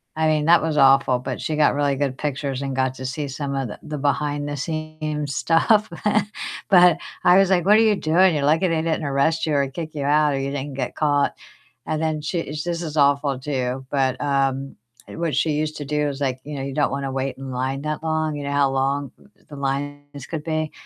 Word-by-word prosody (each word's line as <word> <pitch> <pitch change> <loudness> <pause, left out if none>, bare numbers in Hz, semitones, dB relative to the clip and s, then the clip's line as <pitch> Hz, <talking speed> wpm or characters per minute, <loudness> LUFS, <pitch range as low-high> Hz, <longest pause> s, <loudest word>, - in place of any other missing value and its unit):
I 160 0 +1
mean, 155 -1 +2
that 170 -1 +5
was 160 -2 -1
awful, 135 -2 +5
but 130 0 -5
she 155 - -2
got 150 -1 +3
really 145 -1 +1
good 135 -1 -2
pictures 140 -2 -3
and 135 -1 -3
got 130 0 0
to 130 - -7
see 140 +3 -3
some 140 +1 -4
of 135 -3 -1
the 105 - -8
the 150 -1 -5
behind 145 0 -1
the 145 - -4
scenes 155 -2 -4
stuff, 210 +6 +3 0.8
but 180 -3 +6 0.3
I 180 +1 +6
was 195 -1 +4
like, 175 -3 +3
"What 210 +2 +6
are - - +5
you 220 -2 +4
doing? 175 +2 +3
You're 140 - -1
lucky 160 +5 +3
they 160 -1 +1
didn't 160 -1 -1
arrest 145 +4 +1
you 155 - -1
or 140 -1 +2
kick 160 +2 -6
you 140 - -3
out, 150 0 +3
or 135 - -1
you 135 0 -2
didn't 140 0 -4
get 125 -2 -3
caught." 145 -2 +1 0.5
And 155 0 -2
then 155 -1 -1
she 165 +3 -2
this 165 +3 -4
is 155 -2 -5
awful 140 -1 +3
too, 130 -2 -3
but, 130 -2 +1
um, 135 -1 0 0.3
what 165 -2 -3
she 160 - +1
used 155 +1 -2
to 145 - -5
do 150 +1 0
is, 140 0 -6
like 130 -2 -1
you 150 0 -7
know, 135 - -4
you 135 0 -4
don't 145 -2 +1
wanna 135 -1 -3
wait 135 0 -3
in 135 -1 -7
line 130 +3 -2
that 155 0 -3
long. 155 -1 -1
You 145 - -5
know 140 - -3
how 140 -1 +3
long 135 0 -1 0.4
the 145 - -9
lines 145 0 -4
could 155 -3 -5
be 155 -1 -2
145 Hz, 230 wpm, -22 LUFS, 135-155 Hz, 0.8 s, but